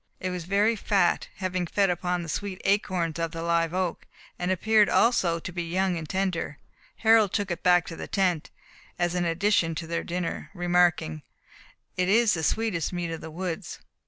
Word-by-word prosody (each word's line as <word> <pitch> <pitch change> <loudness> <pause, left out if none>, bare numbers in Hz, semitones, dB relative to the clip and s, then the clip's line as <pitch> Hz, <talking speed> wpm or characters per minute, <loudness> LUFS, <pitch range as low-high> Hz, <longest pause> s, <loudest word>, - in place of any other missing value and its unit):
It 185 - -3
was 180 -2 -5
very 205 +5 +2
fat, 195 -4 +1
having 185 -2 -2
fed 195 +1 +2
upon 180 0 -2
the - - -7
sweet 190 +4 -4
acorns 180 -5 0
of 165 0 -1
the 165 0 -4
live 170 -1 +1
oak, 185 -1 -2 0.3
and 180 - -1
appeared 210 +3 +3
also 185 -8 +3
to 170 - -7
be 175 0 -3
young 180 +2 0
and 160 -3 -6
tender. 185 -6 -2 0.4
Harold 220 -3 +4
took 205 -3 -1
it 175 - -3
back 180 -2 +4
to 165 - -7
the - - -7
tent, 180 -6 0 0.5
as 175 0 0
an 180 -1 0
addition 165 -1 +1
to 165 - -4
their 170 +1 -2
dinner, 175 -1 -4
remarking, 175 - +2 0.8
"It 180 0 +1
is 225 +1 +4
the 160 - -1
sweetest 180 -1 0
meat 175 -2 -3
of 165 - -5
the 160 - -7
woods." 170 +1 -5
180 Hz, 190 wpm, -26 LUFS, 170-195 Hz, 0.8 s, Harold